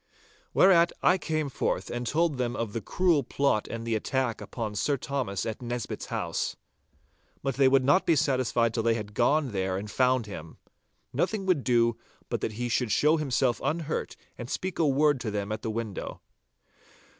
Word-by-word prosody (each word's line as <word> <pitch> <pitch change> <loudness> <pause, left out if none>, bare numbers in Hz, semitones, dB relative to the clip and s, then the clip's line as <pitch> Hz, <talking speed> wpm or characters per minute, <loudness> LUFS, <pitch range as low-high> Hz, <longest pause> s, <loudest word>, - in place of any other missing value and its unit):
Whereat 170 -3 +5
I 185 +1 +4
came 155 -3 -1
forth 135 - -2
and 120 0 -3
told 155 -2 +1
them 120 -1 -1
of 115 -3 -3
the 115 - -2
cruel 170 - +2
plot 130 -3 0
and 115 0 -5
the 115 - -1
attack 120 +2 -1
upon 110 -3 -5
Sir 140 +8 0
Thomas 125 -9 -3
at 110 +1 -4
Nisbett's 120 -3 -4
house. - - -2 0.9
But 135 -1 0
they 135 +1 +4
would 135 0 +4
not 145 +7 +4
be 165 - +5
satisfied 130 -5 +1
till 115 - 0
they 115 0 +2
had 105 -2 -6
gone 140 +4 +2
there 95 -2 -1
and 105 +2 -6
found 130 -1 +2
him. 85 -6 -9 0.6
Nothing 210 -3 0
would 180 -8 +2
do 115 -2 +3 0.3
but - - -2
that 110 - -2
he 120 +3 -3
should 120 -1 0
show 155 +2 +4
himself 130 -4 0
unhurt 155 +2 -2 0.2
and 120 0 -6
speak 185 +3 -3
a 160 - +4
word 145 0 +3
to 115 - -3
them 105 0 -3
at 110 0 -3
the 115 - -3
window. 110 -3 -5
125 Hz, 185 wpm, -28 LUFS, 115-145 Hz, 0.9 s, Whereat